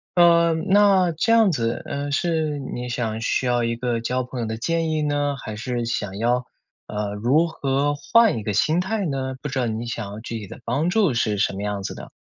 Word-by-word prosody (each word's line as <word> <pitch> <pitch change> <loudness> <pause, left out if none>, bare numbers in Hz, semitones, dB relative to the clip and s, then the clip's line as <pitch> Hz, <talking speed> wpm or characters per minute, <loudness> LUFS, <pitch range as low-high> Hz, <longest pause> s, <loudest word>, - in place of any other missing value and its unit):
呃， 170 -1 +5
那 190 +1 +4
这 165 +8 0
样 225 -5 +5
子， 115 -4 -1
呃， 145 0 -4
是 155 -1 0
你 125 -2 -5
想 115 -3 -2
需 115 +3 0
要 120 -1 +2
一 115 0 0
个 120 -1 -1
交 125 +2 -1
朋 125 0 -7
友 115 - -1
的 110 0 -4
建 165 +5 0
议 155 -1 0
呢， 145 -1 0
还 110 - -5
是 120 +2 -3
想 105 -4 -3
要， 125 +2 +1 0.4
呃， 105 -1 -3
如 135 +10 +2
何 145 -2 0
换 225 - +3
一 110 - -5
个 105 - -2
心 155 - +2
态 200 +2 -1
呢？ 135 -3 -2
不 150 - -4
知 135 -1 -2
道 125 - +1
你 110 +1 -3
想 115 -2 -4
要 105 - -7
具 115 0 -5
体 105 - -8
的 - - -10
帮 145 +8 0
助 190 - +2
是 110 -3 0
什 100 - +1
么 100 - -5
样 105 -1 -2
子 - - -4
的？ - - -9
130 Hz, 245 characters per minute, -23 LUFS, 115-160 Hz, 0.4 s, 呃